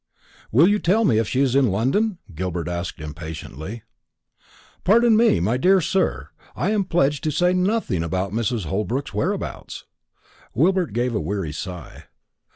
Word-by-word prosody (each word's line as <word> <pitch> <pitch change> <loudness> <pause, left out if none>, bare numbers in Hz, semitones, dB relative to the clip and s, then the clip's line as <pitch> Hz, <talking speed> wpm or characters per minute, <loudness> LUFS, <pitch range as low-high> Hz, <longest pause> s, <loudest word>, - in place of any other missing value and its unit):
"Will 145 +10 +6
you 205 +1 +2
tell 210 +6 +2
me 110 - +3
if 110 - 0
she 130 - 0
is 135 -3 +2
in 135 -3 +4
London?" 135 - +1 0.2
Gilbert 85 0 -3
asked 85 0 -4
impatiently. 80 - -7 1.0
"Pardon 230 +3 +5
me, 225 - +4
my 110 +9 +1
dear 190 +8 +4
sir, 190 +3 -1 0.3
I 190 - 0
am 205 -3 +1
pledged 145 -5 +1
to - - +2
say 180 +4 +2
nothing 185 - 0
about 95 +3 -2
Mrs. 115 -2 -1
Holbrook's 110 - -2
whereabouts." - - -3 0.7
Gilbert 175 - +2
gave 120 +1 0
a 105 - 0
weary 95 -6 -3
sigh. 90 +3 -8
125 Hz, 155 wpm, -22 LUFS, -, 1.0 s, Will